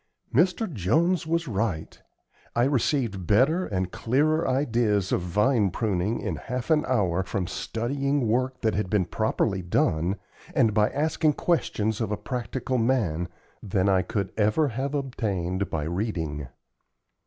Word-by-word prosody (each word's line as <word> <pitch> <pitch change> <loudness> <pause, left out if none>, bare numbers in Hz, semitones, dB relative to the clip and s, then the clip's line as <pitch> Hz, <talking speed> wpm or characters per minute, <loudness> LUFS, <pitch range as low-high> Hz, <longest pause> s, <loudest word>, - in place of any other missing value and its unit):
Mr. 180 - +3
Jones 160 - +1
was 165 0 0
right. 100 -6 -2 0.5
I 120 - +3
received 120 - 0
better 145 - +3
and 95 -3 -2
clearer 155 +7 +1
ideas 115 -7 +1
of - - +1
vine 105 +5 +2
pruning 100 +2 -1
in 90 -8 -3
half 125 - -4
an 155 -1 +4
hour 95 -8 +1
from 95 -1 -2
studying 135 +7 -1
work 125 +3 0
that 110 -2 +1
had 105 -2 -1
been 100 -3 +2
properly 105 0 0
done, 85 +1 +1 0.4
and 110 -2 +4
by 105 0 +3
asking 155 +1 +1
questions 110 - 0
of 110 -2 -1
a 105 - 0
practical 130 0 -3
man, 105 -9 +1 0.3
than 95 -1 0
I 95 -1 +4
could 95 +1 -3
ever 110 +8 +3
have 135 +4 -3
obtained 100 -9 -2
by 75 -2 -2
reading. 80 - -3
110 Hz, 145 wpm, -26 LUFS, 95-135 Hz, 0.5 s, an